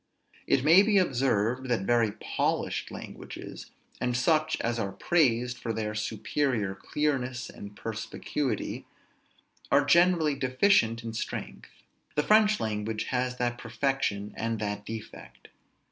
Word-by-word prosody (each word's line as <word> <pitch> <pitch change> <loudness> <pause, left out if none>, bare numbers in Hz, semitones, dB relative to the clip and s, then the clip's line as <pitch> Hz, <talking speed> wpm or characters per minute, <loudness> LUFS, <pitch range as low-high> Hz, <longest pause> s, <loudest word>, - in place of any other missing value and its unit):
It 130 - +3
may 165 +6 +8
be 205 0 +3
observed, 130 - +1
that 120 -5 +1
very 115 0 +2
polished 110 - -2
languages, - - -9 0.3
and 125 -1 0
such 155 +3 +2
as 115 0 -1
are 100 -2 -2
praised 125 -7 +1
for 115 - -3
their 105 -1 -2
superior 110 0 -1
clearness 125 +1 -2
and 100 0 -10
perspicuity, 115 +3 -3 0.8
are 140 +2 +5
generally 170 0 +4
deficient 130 - +2
in 115 -1 -5
strength. 110 - -5 0.5
The 150 - +2
French 215 +1 +4
language 110 0 -2
has 125 0 0
that 120 -1 -1
perfection 120 -4 -1
and 115 0 -2
that 105 -1 -4
defect. 110 -1 -9
120 Hz, 125 wpm, -28 LUFS, 110-145 Hz, 0.8 s, may